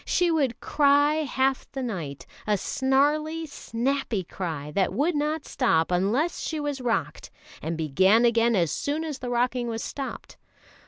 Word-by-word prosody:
She 350 -1 +2
would 275 -7 0
cry 290 +1 +3
half 265 0 0
the 270 -1 -3
night, 165 - -5 0.2
a 210 -1 +2
snarly, 295 - +1
snappy 250 -5 -2
cry, 160 -5 -5
that 190 +3 +1
would 295 - +1
not 300 +1 -1
stop 165 -11 +1
unless 215 - +1
she 315 - -3
was 290 -2 -3
rocked, 240 -2 -2 0.3
and 165 0 -3
began 190 - +4
again 235 0 +3
as 170 -5 +2
soon 295 +3 -2
as 300 -4 -5
the 250 - -5
rocking 245 0 0
was 225 -1 -3
stopped. 275 -2 -6
250 Hz, 155 wpm, -26 LUFS, 200-290 Hz, 0.3 s, began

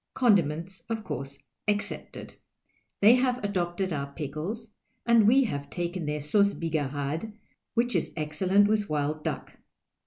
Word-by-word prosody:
Condiments, 185 - +2
of 225 -1 -2
course, 140 -3 -5 0.3
excepted. 205 0 -3 0.7
They 215 +4 +8
have 250 -1 +2
adoj)tcd 185 -1 -1
our 140 -1 -4
pickles, 165 - -5 0.4
and 230 -3 +5
we 265 +4 +6
have 145 - -3
taken 175 -2 -3
their 150 0 -2
sauce 200 +7 +3
higarade, 155 +4 -2 0.4
which 240 +1 +1
is - - 0
excellent 185 +7 +3
with 210 -1 +1
wild 150 0 -1
duck. - - -4
180 Hz, 130 wpm, -28 LUFS, 150-210 Hz, 0.7 s, They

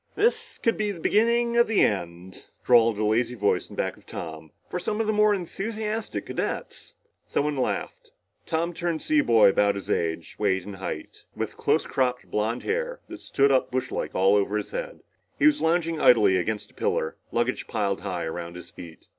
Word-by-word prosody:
"This 460 +4 +1
could 230 - +1
be 215 -1 0
the 195 -4 -5
beginning 235 +5 +2
of 235 - +5
the 220 -2 +2
end," 90 -2 -2 0.2
drawled 115 -3 +5
a 105 - 0
lazy 115 +3 +1
voice 105 -3 0
in - - -10
back - - -2
of - - -22
Tom, 80 -1 -7 0.2
"for 180 - -3
some 210 +4 -2
of 225 - +1
the 215 - +1
more 210 0 +4
enthusiastic 210 - -3
cadets." - - -4 0.3
Someone 150 0 0
laughed. 130 - -3 0.4
Tom 165 +2 -1
turned 170 -1 -2
to - - -8
see 310 -1 +3
a - - +3
boy 110 -3 +6
about 100 +1 +2
his 100 - -5
own - - +4
age, 80 -1 -4
weight 95 -3 +1
and 100 -1 -8
height, 85 -4 -7
with - - -4
close - - +1
cropped 125 -2 -1
blond 110 +3 -1
hair - - -2
that 340 -1 -9
stood 140 0 +2
up 130 - +2
brushlike 130 0 -3
all 95 +2 +4
over 100 +1 +1
his 105 - -5
head. - - -5 0.4
He - - +2
was 305 -1 +5
lounging 165 -1 +1
idly 110 -6 +6
against 105 +4 -2
a - - -29
pillar, 80 - -1 0.2
luggage - - -1
piled 100 -2 -1
high 90 -4 -3
around 85 +1 -5
his 85 -1 -10
feet. 85 -2 -12
125 Hz, 200 wpm, -26 LUFS, -, 0.4 s, boy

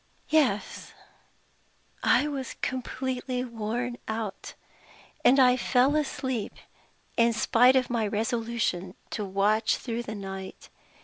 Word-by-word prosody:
"Yes. 275 -10 +1 1.1
I 295 - +3
was 270 -4 -4
completely 255 0 -2
worn 240 +1 -3
out; 220 -3 -5 0.7
and 270 +2 +6
I 250 -1 +6
fell 255 +3 +2
asleep, 260 -6 -2 0.6
in 235 0 +4
spite 245 +3 +4
of 255 -2 +2
my 225 -3 +1
resolution 225 -4 -1 0.2
to 215 - -3
watch 205 +3 +2
through 235 -1 -4
the 220 -2 -6
night. 195 -1 -8
235 Hz, 110 wpm, -27 LUFS, 215-255 Hz, 1.1 s, and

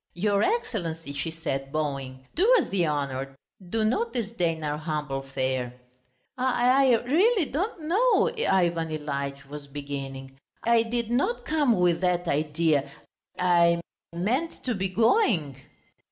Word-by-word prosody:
"Your 200 +2 +1
Excellency," 175 - -2
she 145 +4 -3
said, 135 -4 -4
bowing, 135 -4 -3
"do 410 +8 +3
us 405 - +1
the 180 -4 +1
honour, 135 -2 -3 0.3
do 220 +2 0
not 435 - 0
disdain 180 -9 -1
our 150 0 -2
humble 150 -3 -3
fare." 130 -2 -2 0.7
"I... 255 +1 +3
I 225 - -1
really 365 - +3
don't 340 +4 -3
know," 470 +7 +3
Ivan 175 - +1
Ilyitch 140 -2 -4
was 145 0 -9
beginning. 135 -2 -7 0.2
"I 235 0 +4
did 235 0 -2
not 330 - 0
come 290 - +2
with 175 -1 +2
that 180 -1 +1
idea... 150 -1 +1 0.5
I... 170 -1 +4 0.3
meant 230 - -2
to 250 - -1
be 190 -2 -2
going...." 195 - +2
170 Hz, 135 wpm, -26 LUFS, 145-240 Hz, 0.7 s, I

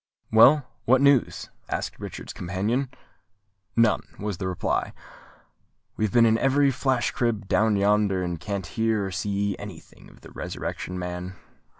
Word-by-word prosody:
"Well, 130 +6 +6 0.2
what 130 +2 +5
news?" 140 -2 +2 0.2
asked - - -4
Richard's - - -7
companion. 105 +9 -2 0.9
"None," 115 -2 +3 0.2
was 105 -3 -4
the 95 - -2
reply. 90 -2 -1 1.0
"We 110 - 0
have 105 - -2
been 120 -1 +5
in 110 0 +3
every 140 +1 +3
flash 130 -1 0
crib 115 -4 -1
down 110 +1 +2
yonder, 100 -1 +2
and 85 -2 -3
can't 100 +1 -4
hear 110 0 0
or 95 - -4
see 100 +2 -1
any 100 -5 -8
thing - - -19
of - - -19
the - - -13
Resurrection 90 - -5
Man." 90 +1 -5
105 Hz, 155 wpm, -25 LUFS, 95-120 Hz, 1.0 s, Well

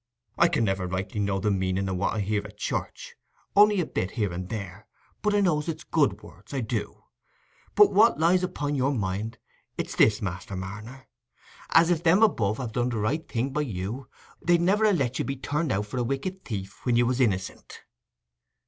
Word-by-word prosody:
I 170 - +5
can 160 -8 +1
never 95 -3 0
rightly 95 +4 -3
know 100 -1 0
the 105 +2 0
meaning 95 0 0
o' 95 - -2
what 95 +4 -1
I 110 - 0
hear 105 +1 0
at - - -12
church, - - -4 0.4
only 205 0 +6
a 175 - +1
bit 90 - -2
here 105 -5 0
and 90 +1 -5
there, 100 -2 -6 0.3
but 210 -1 +1
I 205 - +3
know 175 -6 +2
it's 160 +1 -5
good 150 -4 +1
words—I 135 -2 -7
do. 110 -2 -4 0.7
But 415 -1 +6
what 220 -2 +5
lies 175 +3 +3
upo' 180 -5 -3
your 140 -1 +1
mind—it's 105 +1 -5
this, 110 0 +4
Master 95 -2 -5
Marner: 105 +8 -8 0.6
as, 165 +1 +5
if 165 -2 +1
Them 175 +6 +4
above 110 - +2
had 125 -4 -4
done 120 +1 0
the 120 - -3
right 135 +10 -1
thing 125 +3 -1
by 150 +3 0
you, 115 +1 -4 0.3
They'd 175 0 +3
never 210 +4 +3
ha' - - +2
let 130 -3 -1
you - - 0
be 135 - -2
turned 150 +3 -2
out 105 +2 0
for 115 +5 -6
a - - +1
wicked 135 +10 -3
thief 100 -4 -6
when 125 -2 +1
you 120 +1 +4
was 125 +1 0
innicent." 95 -6 -2
120 Hz, 200 wpm, -26 LUFS, 100-160 Hz, 0.7 s, only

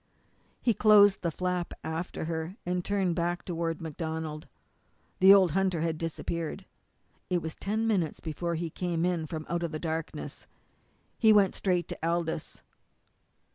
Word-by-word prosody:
He 235 - +4
closed 205 -1 +6
the 170 - 0
flap 180 +1 -2
after 160 +1 -4
her, 165 +2 -3
and 180 0 -1
turned 190 -3 0
back 175 +1 -1
toward 165 -2 -2
MacDonald. 160 -1 -5 0.7
The 190 +1 +8
old 190 -4 +7
hunter 185 -1 +1
had 160 -1 -1
disappeared. 165 0 -4 0.6
It 180 - +2
was 160 -2 -5
ten 215 +3 -2
minutes 190 -8 0
before 170 +2 -3
he 165 0 -3
came 175 -1 -1
in 170 -3 0
from 155 0 -5
out 170 0 -1
of 170 -2 -2
the 155 - -3
darkness. 160 0 -5 0.7
He 220 -2 +6
went 200 -3 +5
straight 180 -3 0
to - - -6
Aldous. 165 -1 -2
170 Hz, 150 wpm, -29 LUFS, 160-185 Hz, 0.7 s, The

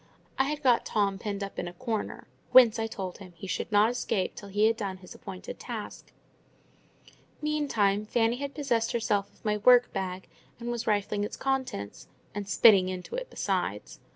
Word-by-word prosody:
I 265 - +4
had 295 +1 -3
got 245 -3 +4
Tom 200 -2 0
pinned 200 -1 -3
up 200 - -6
in 175 - -3
a 175 - -7
corner, 230 -1 -4 0.3
whence, 235 -3 +8
I 225 - 0
told 190 -5 -6
him, 185 -3 -12
he 170 - -9
should 195 - -3
not 210 +2 +5
escape 205 -6 -1
till 200 - -10
he 205 +2 +2
had 225 +1 +4
done 195 -4 -4
his 185 -1 -12
appointed 185 -1 -8
task. - - -7 1.3
Meantime, 230 -10 +1
Fanny 230 +1 +2
had 280 +1 -5
possessed 240 -6 0
herself 215 -4 0
of - - -28
my 210 0 +1
work 245 +3 +5
bag, 185 -1 -4 0.3
and 240 0 -4
was 235 -1 -4
rifling 205 -1 +1
its 210 - -4
contents—and 205 - -4
spitting 195 -3 +6
into 185 -1 -6
it - - -4
besides. - - -2
210 Hz, 180 wpm, -28 LUFS, 195-240 Hz, 1.3 s, whence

